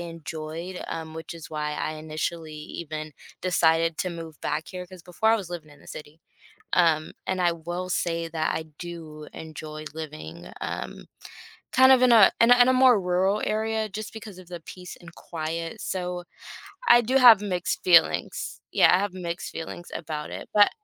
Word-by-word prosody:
enjoyed, 165 +1 -6
um, 160 -1 -5
which 160 +1 -7
is 165 -1 -10
why 150 -1 -2
I 155 - -2
initially 155 +1 -4
even 155 0 -6 0.3
decided 165 -2 +2
to 185 - -1
move 165 -3 -9
back 150 +2 -2
here 180 -1 -7
'cause 185 -1 -13
before 180 +6 0
I - - +4
was 190 -5 -6
living 160 -4 -7
in 145 - -18
the - - -18
city, 150 +1 -10 0.6
um, 160 -3 +3
and 185 -1 -1
I 175 - +3
will 175 +2 -5
say 165 -1 -1
that 155 -1 -1
I 160 - -3
do 160 -3 -8
enjoy 155 -1 -8
living, 145 - -8
um, - - -5 0.7
kind 260 +1 +7
of 260 - +6
in 255 - +6
a 220 -4 +8
in 230 - +6
a 245 - +8
in 245 - +7
a - - +5
more 255 -3 +6
rural 185 +3 +1
area 220 0 -1
just 215 +1 -6
because 210 -4 -9
of 180 -1 -13
the 175 -2 -7
peace 180 +2 -10
and 170 -1 -13
quiet, 165 0 -5
so 180 -1 -3 0.6
I 240 - +8
do 250 +4 0
have 235 -5 +9
mixed 180 -3 -2
feelings. 175 -2 +3
Yeah, - - +6
I 180 - +5
have 200 -2 -2
mixed 175 -2 -5
feelings 165 +1 -7
about 150 -2 -5
it, - - -7
but 205 -1 +7
170 Hz, 185 wpm, -26 LUFS, 160-185 Hz, 0.7 s, have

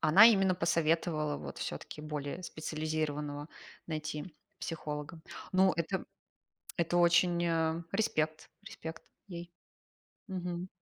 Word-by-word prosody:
она 175 +8 +9
именно 195 -5 +5
посоветовала 165 -2 +1
вот 70 -1 -7
всё-таки - - -5
более 150 +3 -4
специализированного 155 -2 -2 0.4
найти 155 0 -4 0.2
психолога. 150 0 -4 0.3
Ну, 190 0 +6
это 170 +3 -1 0.7
это 170 0 +2
очень, 175 0 +5
э 165 0 +1
респект 155 -7 0
респект 165 -6 -7 0.3
ей. 175 -2 -7 0.8
Мгм. 180 -1 -3
165 Hz, 100 wpm, -33 LUFS, 155-175 Hz, 0.8 s, она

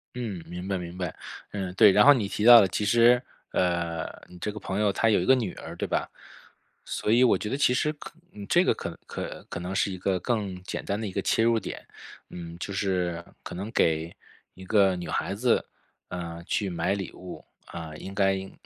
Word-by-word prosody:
嗯， 105 -8 -4
明 90 +2 -6
白 100 - -1
明 90 0 -7
白。 90 -4 -4 0.4
嗯， 95 -3 -4
对， 100 - +7
然 105 - +6
后 145 - +9
你 110 -7 -1
提 105 - -3
到 120 0 +11
的 100 - +4
其 105 - -2
实， 120 +3 +5 0.3
呃， 85 -2 0 0.2
你 90 0 -14
这 105 - -3
个 105 - -8
朋 95 +1 -3
友 105 -2 +3
他 115 +4 +1
有 100 - +4
一 90 - -1
个 130 - +6
女 110 -8 -2
儿 - - -9
对 - - -3
吧？ - - -1 0.7
所 105 - -2
以 120 +2 +5
我 125 - +5
觉 105 - -5
得 135 - -1
其 125 -3 +3
实 150 +3 +1
可 150 - -11 0.4
这 - - +4
个 - - +4
可 - - -7
可 - - -6
可 - - -5
能 90 +2 -5
是 95 - +1
一 95 - -6
个 95 -1 0
更 100 -6 -2
简 - - -5
单 100 +2 -2
的 110 - -3
一 95 - -4
个 - - -2
切 115 - +2
入 115 -1 +3
点。 - - -8 0.4
嗯， 85 -1 -8
就 100 - -5
是 90 -4 -1 0.2
可 - - -7
能 100 +5 -5
给 80 -2 +1 0.4
一 95 0 -11
个 95 -2 +4
女 90 - -6
孩 95 - -2
子， 120 +3 +2 0.4
呃， 85 -1 -6
去 100 -4 -1
买 85 +4 0
礼 95 -3 -5
物， 90 -1 -10 0.2
啊， 80 -2 -7
应 95 +4 -8
该 95 -1 +1
95 Hz, 240 characters per minute, -27 LUFS, 90-110 Hz, 0.7 s, 到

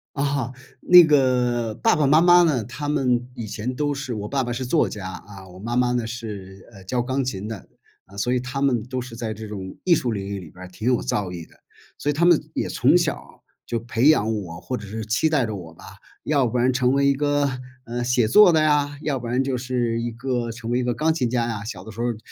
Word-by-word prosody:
啊， 140 -3 -1 0.3
那 180 -1 +9
个， 125 -6 +2
爸 225 - +2
爸 150 -3 +2
妈 150 +4 +5
妈 175 0 +7
呢， 145 -9 +1
他 130 +6 -6
们 125 -4 +1
以 115 -3 -6
前 115 +4 -4
都 145 +1 -1
是 135 -3 -4
我 105 -2 -4
爸 135 -2 0
爸 120 -1 -3
是 125 +2 -3
作 135 +6 +2
家， 100 -3 -6
啊， 95 +1 -11
我 90 - -13
妈 115 +5 -4
妈 125 0 +2
呢， 120 -2 -1
是， 105 -5 -8
呃， 100 -3 -14
教 120 +6 -1
钢 130 +2 -1
琴 105 -5 -4
的。 110 -4 -7 0.4
啊， 100 - -15
所 120 +5 0
以 125 - +2
他 130 +2 -5
们 125 -5 +2
都 130 +2 -4
是 125 -2 -7
在 115 -2 -4
这 110 +1 -8
种 95 -3 -7
艺 175 -2 +5
术 135 -7 -1
领 100 -3 -4
域 100 0 -4
里 90 -5 -9
边 90 +1 -11
儿 - - -10
挺 90 +5 -9
有 125 - +1
造 100 -3 -2
诣 85 -2 -8
的。 - - -23 0.4
所 145 - -2
以 - - +2
他 165 +4 +1
们 175 -2 +6 0.2
也 - - -2
从 - - +3
小 - - 0
儿 - - -16 0.3
就 115 - -2
培 115 +4 +2
养 110 -7 +3
我， 85 -3 -8
或 125 - -4
者 105 - -7
是 110 +2 -6
期 115 +9 +1
待 145 -5 +2
着 110 -2 -4
我 85 -4 -9
吧， - - -15 0.4
要 145 -3 +2
不 125 +1 -1
然 125 +2 +2
成 125 0 +2
为 140 0 +3
一 140 - +4
个， 145 0 +1 0.4
嗯， 120 +1 -3
写 125 -2 +2
作 210 - +7
的 160 -2 +3
呀， 145 -1 +1
要 140 -3 -1
不 120 - -8
然 125 +2 +1
就 135 -1 -1
是 120 -2 -1
一 120 0 -3
个 120 0 -3
成 115 0 -7
为 120 - +1
一 - - -1
个 125 0 0
钢 155 +7 +1
琴 130 -7 -1
家 120 -1 0
呀， 110 -3 -4
小 105 -5 -7
的 110 - -9
时 115 - -6
候 120 - 0
儿 120 -3 -2
120 Hz, 280 characters per minute, -23 LUFS, 110-140 Hz, 0.4 s, 那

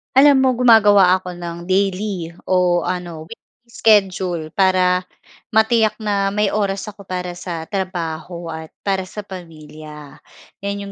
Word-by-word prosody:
Alam 270 -1 +6
mo, 260 - +4
gumagawa 210 -6 +5
ako 180 -1 -7
ng 170 0 -6
daily 185 -2 -1
o 180 -2 +2
ano, 175 -3 -4
weekly 230 - -9 0.3
schedule 185 -8 +1
para 185 -1 +2 0.5
matiyak 220 0 +3
na 200 -2 0
may 210 -1 +1
oras 200 -2 -1
ako 200 -1 -16
para 180 -1 -4
sa 175 -2 -6
trabaho 170 -2 -5
at 160 0 -7 0.2
para 190 -2 -1
sa 210 +2 -8
pamilya. 155 -5 -11 0.4
'Yan 200 0 -4
'yong 200 - -8
185 Hz, 135 wpm, -19 LUFS, 170-200 Hz, 0.5 s, Alam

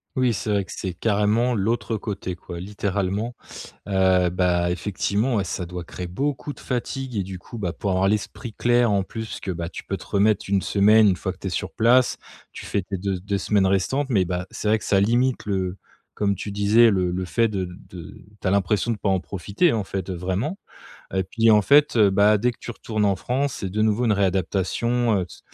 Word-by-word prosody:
Oui, 125 -2 +2
c'est 100 +3 -4
vrai 100 -2 +1
que - - -12
c'est 95 -2 -4
carrément 110 +5 +1
l'autre 110 +1 -1
côté 95 -3 -5
quoi, 85 0 -9
littéralement. 100 +3 -2 0.5
Heu, 95 -2 +3
bah, 90 -1 +1
effectivement, 105 +6 -1
ouais, 100 - +1
ça 90 0 -4
doit 90 0 -6
créer 90 +2 -7
beaucoup 140 +9 -3
de - - -17
fatigue 130 0 -4
et 100 - 0
du 95 -1 -7
coup, 115 - -10
bah, 90 -5 -2
pour 100 - -3
avoir 95 +1 +2
l'esprit 105 +3 -2
clair, 120 -1 +2
en 100 - +2
plus 110 +3 -6
que, 95 - -6
bah, 85 -2 -3
parce 85 - -4
que - - -12
tu - - -6
peux 95 - -3
te - - -12
remettre 105 0 +2
1 100 -1 +2
semaine 105 +2 +5
une 95 - +2
fois - - -4
que - - -23
tu - - -5
es - - -1
sur - - -3
place. 120 +2 +3 0.3
Tu - - -9
fais 100 - -1
tes 95 +1 -4
de 95 0 -2
2 100 +2 -2
semaines 100 +1 +2
restantes 100 +9 +1
mais, 95 -5 +3
bah, 90 0 -3
c'est 105 - -4
vrai 110 - +4
que - - -11
ça 100 - +3
limite 120 +5 +1
le 95 -2 -2 0.4
comme 100 -1 0
tu 100 +2 -6
disais, 105 +3 +5
le 90 -2 +1
le 90 +1 -2
fait 115 +7 +2
de 95 -3 -2 0.2
de 85 -2 -9 0.3
tu - - -10
as - - +2
l'impression 100 +4 +1
de 110 - -2
pas - - -3
en 95 -2 +1
profiter, 100 - 0
en 105 -4 -1
fait, 95 -1 -4
heu, 95 - -3
vraiment 95 - -2 0.6
et 95 - +2
puis, 115 +4 +2
en 105 -1 +5
fait, 145 +1 +4
heu, 105 -3 +5
bah, 105 +2 +4
dès 120 +4 +2
que 120 - -14
tu - - -7
retournes 110 -2 -2
en 100 -2 +2
France, 135 +6 -1
c'est 95 - -3
de 105 +3 -2
nouveau 110 +3 +2
une 110 - +3
réadaptation, 100 +4 +1
heu, 90 - -3
c - - -14
100 Hz, 235 wpm, -23 LUFS, 95-115 Hz, 0.6 s, semaine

